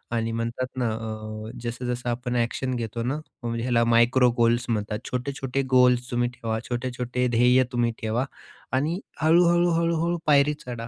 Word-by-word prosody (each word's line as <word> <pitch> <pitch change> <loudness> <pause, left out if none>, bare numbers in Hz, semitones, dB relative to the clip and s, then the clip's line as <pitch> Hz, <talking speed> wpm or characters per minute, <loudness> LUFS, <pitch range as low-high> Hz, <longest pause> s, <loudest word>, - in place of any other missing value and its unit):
आणि 115 0 -1
म्हणतात 115 +2 -2
ना 125 -2 +1
अ, 110 0 -6
जसं-जसं 120 +1 -3
आपण 120 +1 -2
एक्शन 125 +2 -1
घेतो 115 -1 -3
ना, 130 +4 -1 0.4
ह्याला 115 0 +1
मायक्रो 120 +2 +4
गोल्स 120 0 +3
म्हणतात. 105 -1 -1
छोटे-छोटे 135 +1 -2
गोल्स 125 -1 +4
तुम्ही 120 0 +1
ठेवा. 115 -2 -3
छोटे-छोटे 125 0 -2
ध्येय 125 +2 +5
तुम्ही 120 -1 +1
ठेवा 115 +4 0 0.5
आणि 160 +7 0 0.2
हळू-हळू-हळू-हळू 170 0 +3
पायरी 145 0 +5
चढा. 120 -2 -6
125 Hz, 140 wpm, -25 LUFS, 115-130 Hz, 0.5 s, ध्येय